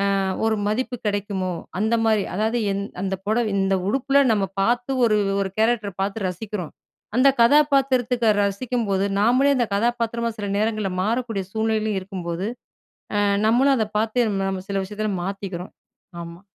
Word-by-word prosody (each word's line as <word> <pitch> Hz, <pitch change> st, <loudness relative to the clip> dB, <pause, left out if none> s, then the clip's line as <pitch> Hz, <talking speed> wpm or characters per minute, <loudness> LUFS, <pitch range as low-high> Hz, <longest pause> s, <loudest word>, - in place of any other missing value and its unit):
அ -, -, +1 dB, 0.3 s
ஒரு 220 Hz, 0 st, +2 dB
மதிப்பு 245 Hz, +4 st, -1 dB
கிடைக்குமோ? 200 Hz, -2 st, -2 dB, 0.3 s
அந்த 220 Hz, +2 st, +2 dB
மாரி. 215 Hz, -2 st, +3 dB
அதாவது 220 Hz, +4 st, 0 dB
எந் 200 Hz, -, -2 dB, 0.2 s
அந்த 195 Hz, 0 st, -1 dB
புடவை 220 Hz, +2 st, +1 dB
இந்த 195 Hz, 0 st, +2 dB
உடுப்புல 275 Hz, +3 st, +3 dB
நம்ம 205 Hz, -3 st, +2 dB, 0.2 s
பார்த்து 245 Hz, +5 st, +1 dB
ஒரு 215 Hz, -2 st, +3 dB, 0.2 s
1 195 Hz, -, -1 dB
கேரக்டர 220 Hz, -2 st, +1 dB
பார்த்து 195 Hz, +1 st, -2 dB
ரசிக்கிறோம். 180 Hz, -1 st, -6 dB, 0.4 s
அந்த 265 Hz, +2 st, +6 dB
கதாபாத்திரத்துக்கு 260 Hz, -3 st, +3 dB
ரசிக்கும்போது, 200 Hz, -1 st, -1 dB
நாம்ளே 255 Hz, +6 st, +4 dB
அந்த 240 Hz, -2 st, +1 dB
கதாபாத்திரமா 235 Hz, +1 st, 0 dB
சில 205 Hz, -1 st, -4 dB
நேரங்கள்ல 215 Hz, -2 st, 0 dB
மாறக்கூடிய 225 Hz, -1 st, -1 dB
சூழ்நிலைலயும் 220 Hz, -2 st, 0 dB
இருக்கும்போது, 185 Hz, -1 st, -4 dB, 0.7 s
அ -, -, +3 dB, 0.3 s
நம்மளும் 265 Hz, +5 st, +4 dB
அத 220 Hz, -3 st, +1 dB
பார்த்தே 225 Hz, +2 st, +1 dB, 0.2 s
நம்ம 190 Hz, -1 st, -4 dB
சில 195 Hz, -1 st, 0 dB
விஷயத்துல 210 Hz, +2 st, -3 dB
மாத்திக்கிறோம். 195 Hz, -2 st, -5 dB, 0.5 s
ஆமா. 170 Hz, +2 st, -10 dB
215 Hz, 140 wpm, -23 LUFS, 195-240 Hz, 0.7 s, அந்த